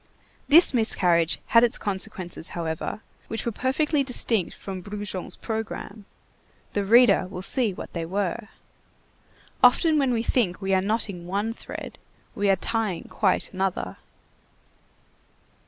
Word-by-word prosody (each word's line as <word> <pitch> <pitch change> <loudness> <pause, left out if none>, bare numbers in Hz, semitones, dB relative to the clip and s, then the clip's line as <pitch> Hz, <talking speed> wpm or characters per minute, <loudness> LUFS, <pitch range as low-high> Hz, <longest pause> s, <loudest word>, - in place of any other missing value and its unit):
This 320 0 +7
miscarriage 175 -8 +2
had 230 0 +7
its 240 - +2
consequences, 190 -4 -3
however, 165 +5 -4 0.3
which 225 -1 -4
were 235 - 0
perfectly 280 +5 0
distinct 230 -7 -1
from 190 -2 -7
Brujon's 205 -1 -5
programme. 220 -2 -5 0.7
The 205 - 0
reader 215 -2 +5
will 185 0 -7
see 235 +1 +3
what 180 - -8
they 165 -1 -4
were. 200 +4 -2 1.2
Often 305 +5 +5
when 270 -3 +2
we 230 -2 0
think 220 -7 0
we 195 -1 -1
are 190 - +3
knotting 200 -4 -2
one 205 +5 -1
thread, - - -9 0.3
we 205 0 0
are 195 - +5
tying 210 -2 -2
quite 195 -1 +1
another. 185 - -2
205 Hz, 130 wpm, -25 LUFS, 185-235 Hz, 1.2 s, This